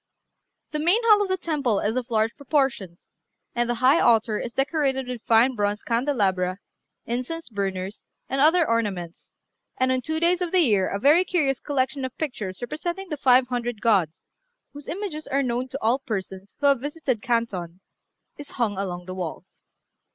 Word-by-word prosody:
The 300 - -2
main 350 +8 +3
hall 425 -2 +6
of 405 - 0
the 375 0 0
temple 285 - 0
is 215 +3 -1
of 255 0 -3
large 220 0 +1
proportions, 270 - -2 0.4
and 240 0 0
the 240 - +1
high 255 +6 +4
altar 225 -2 +3
is 240 - -5
decorated 270 -1 0
with 250 -2 -5
fine 235 +2 +5
bronze 205 -2 -1
candelabra, 200 -8 0 0.5
incense 255 +8 -4
burners, 195 -2 -4 0.2
and 270 0 -1
other 325 +3 +5
ornaments, 195 -7 -2 0.5
and 260 0 +2
on 255 0 +1
two 315 +5 -2
days 345 +2 +2
of 350 -2 -1
the 370 - +4
year 205 - +2
a - - -2
very 295 - +5
curious 300 -8 0
collection 270 -1 -1
of 260 -1 -5
pictures 220 -10 -4
representing 345 +8 -4
the 300 - -3
five 255 -2 +4
hundred 240 -2 -3
gods, 190 -8 +1 0.5
whose 290 0 -11
images 345 -5 -5
are 275 +1 +1
known 250 0 -1
to 265 +1 -5
all 235 +4 +3
persons 195 -6 -6
who 290 - -1
have 280 -3 +4
visited 290 -5 -2
Canton, 195 -8 -2 0.6
is 290 - -9
hung 210 -6 0
along 180 -2 -4
the 185 - -6
walls. 180 -4 -7
250 Hz, 175 wpm, -24 LUFS, 210-290 Hz, 0.6 s, hall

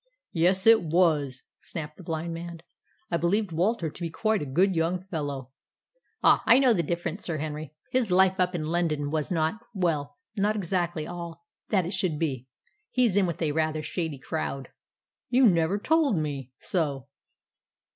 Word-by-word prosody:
"Yes, 185 +2 +2
it 225 0 +7
was," 155 -6 +1 0.2
snapped 150 -3 -7
the - - -11
blind 165 0 -3
man. 170 0 -7 0.5
"I 170 - +2
believed 195 +3 +1
Walter 175 +2 +1
to - - -13
be 170 - -2
quite 215 +6 0
a 145 - -4
good 180 +8 +2
young 165 +2 +1
fellow." 145 -8 -5 0.7
"Ah, - - +6
I - - +8
knew 260 -3 +5
different, 170 +3 -3
Sir 165 -3 -3
Henry. 155 0 -5 0.2
His 250 -4 +1
life 190 +1 +4
up 180 0 +2
in 155 -3 -2
London 155 -3 0
was 155 +1 -1
not 160 +4 0 0.2
well, 165 - -1 0.2
not 210 +1 +1
exactly 175 -5 -1
all 170 0 -7 0.2
that 190 -4 +2
it 180 - -4
should 185 -5 0
be. 135 -6 -2 0.4
He's 245 -6 +2
in 200 -2 +3
with 170 0 -3
a 155 - +1
rather 155 0 0
shady 160 -3 -3
crowd." 135 -1 -4 0.6
"You 255 +1 +5
never 170 0 +2
told 300 - +2
me 140 -4 -3
so." 140 -7 -2
170 Hz, 165 wpm, -27 LUFS, 155-190 Hz, 0.7 s, I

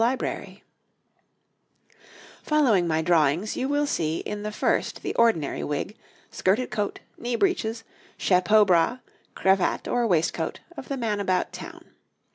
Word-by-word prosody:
] 235 +2 +4 2.3
Following 245 - +3
my 160 0 +1
drawings, 165 +4 +2
you 265 - -2
will 290 +1 +1
see 160 - -1
in 210 0 -5
the 210 0 -4
first - - -1
the - - -2
ordinary 225 -12 +2
wig, 150 +8 -3 0.4
skirted 210 +7 0
coat, 205 -1 -2 0.2
knee 240 0 -2
breeches, 230 - 0 0.3
chapeau 205 +3 +4
bras, 180 +5 +3 0.4
cravat 190 -1 +1
or 240 -1 +1
waistcoat, 165 -3 0 0.2
of 265 - -8
the 275 - -3
man 220 -4 -1
about 185 -2 0
town. - - -10
210 Hz, 130 wpm, -25 LUFS, 175-235 Hz, 2.3 s, ]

